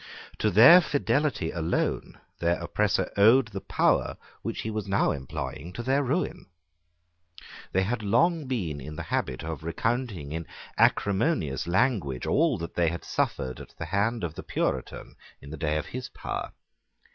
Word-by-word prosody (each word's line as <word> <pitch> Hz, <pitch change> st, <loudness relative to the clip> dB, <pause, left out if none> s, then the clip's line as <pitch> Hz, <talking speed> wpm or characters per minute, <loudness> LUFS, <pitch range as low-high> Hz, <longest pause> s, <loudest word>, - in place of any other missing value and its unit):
To 110 Hz, -, +2 dB
their 120 Hz, -, +9 dB
fidelity 145 Hz, -, 0 dB
alone 85 Hz, -1 st, -2 dB, 0.2 s
their 85 Hz, +1 st, +1 dB
oppressor 105 Hz, +4 st, 0 dB
owed 110 Hz, +4 st, +6 dB
the 95 Hz, -2 st, -6 dB
power -, -, +1 dB, 0.2 s
which -, -, -4 dB
he 110 Hz, -, -4 dB
was 105 Hz, -1 st, -4 dB
now 95 Hz, -, +2 dB
employing 70 Hz, +4 st, -5 dB
to 120 Hz, -, -5 dB
their 135 Hz, +3 st, +2 dB
ruin. 140 Hz, -, -2 dB, 1.2 s
They 95 Hz, -, +2 dB
had 115 Hz, +3 st, -2 dB
long 135 Hz, -, +2 dB
been 85 Hz, -, -2 dB
in 75 Hz, +3 st, -8 dB
the 85 Hz, -, -5 dB
habit 65 Hz, -3 st, -2 dB
of 80 Hz, -2 st, -5 dB
recounting 100 Hz, -, -2 dB
in 80 Hz, 0 st, -4 dB, 0.3 s
acrimonious 100 Hz, -, +1 dB
language 90 Hz, -, +1 dB
all 155 Hz, -5 st, +2 dB
that 85 Hz, -1 st, -6 dB
they 85 Hz, -2 st, +2 dB
had 85 Hz, 0 st, -5 dB
suffered 65 Hz, -1 st, -2 dB
at -, -, -12 dB
the 85 Hz, -, -4 dB
hand 100 Hz, +6 st, 0 dB
of 85 Hz, -3 st, -3 dB
the -, -, -7 dB
Puritan -, -, -3 dB, 0.2 s
in 70 Hz, -, -12 dB
the -, -, -5 dB
day 75 Hz, +1 st, 0 dB
of 75 Hz, -, -3 dB
his 130 Hz, 0 st, -6 dB
power. -, -, -5 dB
100 Hz, 160 wpm, -27 LUFS, 80-120 Hz, 1.2 s, their